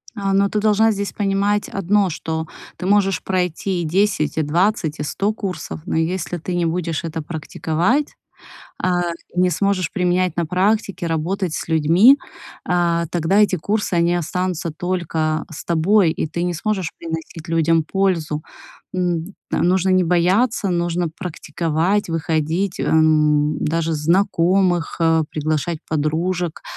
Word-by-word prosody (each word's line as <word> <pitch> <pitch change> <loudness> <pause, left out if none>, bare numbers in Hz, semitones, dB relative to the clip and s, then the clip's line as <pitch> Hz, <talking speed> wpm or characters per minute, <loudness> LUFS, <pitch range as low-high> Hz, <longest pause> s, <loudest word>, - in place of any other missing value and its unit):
А, 195 -2 -1
но 200 +1 +3
ты 210 - 0
должна 215 +1 +3
здесь 200 -1 -3
понимать 205 0 0
одно, 195 +1 +1
что 160 0 -4 0.3
ты 180 - -6
можешь 195 -1 +2
пройти 180 0 -1
и - - -3
10, 180 -2 +1
и - - +3
20, 170 +1 0
и - - -2
100 200 +8 -1
курсов, 195 -6 -5
но 185 - -1
если 175 +2 -1
ты 175 +2 -4
не 175 -1 +1
будешь 165 -1 -2
это 165 -1 -4
практиковать, 170 - -1 0.7
э, - - +2 0.5
не 180 0 +3
сможешь 185 0 0
применять 180 -1 +1
на 170 - +1
практике, 195 +2 0
работать 170 +2 -1
с - - -4
людьми, 170 - +5 0.5
э, 170 -1 +1
тогда 175 +4 +2
эти 205 -3 +3
курсы, 205 +3 -1
они 170 0 +2
останутся 175 0 -2
только 160 -2 -2
с 160 - -8
тобой, 175 +2 +3
и 160 - -2
ты 165 +2 -4
не 175 0 0
сможешь 190 0 -2
приносить 165 +1 -7
людям 165 0 +2
пользу. 165 -5 0 0.5
М, 180 0 -1 0.2
т - - 0
нужно 185 +1 +2
не 185 -1 +4
бояться, 190 +6 +2
нужно 175 0 0
практиковать, 170 +2 -1
выходить, 165 +3 -1
эм, 150 -1 +3
даже 165 +1 0
знакомых, 175 +2 +2
э, 165 -1 +3
приглашать 155 +1 -1
подружек 165 +3 -1
175 Hz, 145 wpm, -20 LUFS, 160-195 Hz, 0.7 s, людьми